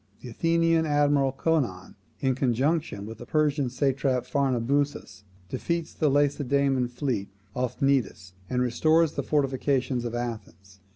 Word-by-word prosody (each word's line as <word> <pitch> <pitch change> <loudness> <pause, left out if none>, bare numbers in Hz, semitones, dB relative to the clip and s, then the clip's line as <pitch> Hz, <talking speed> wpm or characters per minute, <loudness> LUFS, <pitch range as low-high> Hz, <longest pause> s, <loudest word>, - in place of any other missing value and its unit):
The 125 - -8
Athenian 165 +4 +2
admiral 145 -2 +2
Conon, 135 - -1 0.3
in 135 -1 +2
conjunction 130 -2 0
with 110 +1 -9
the 120 - -8
Persian 145 -3 +1
satrap 130 -1 0
Pharnabazus, 140 -3 -1 0.2
defeats 170 - -3
the 155 - +1
Lacedaemonian 140 -2 +1
fleet 120 -5 -3 0.3
off 125 -1 -2
Cnidus, 130 -9 0 0.2
and 125 0 +1
restores 155 +6 +3
the - - -3
fortifications 135 -3 0
of 120 0 -4
Athens. 100 -5 -6
135 Hz, 125 wpm, -26 LUFS, 120-145 Hz, 0.3 s, restores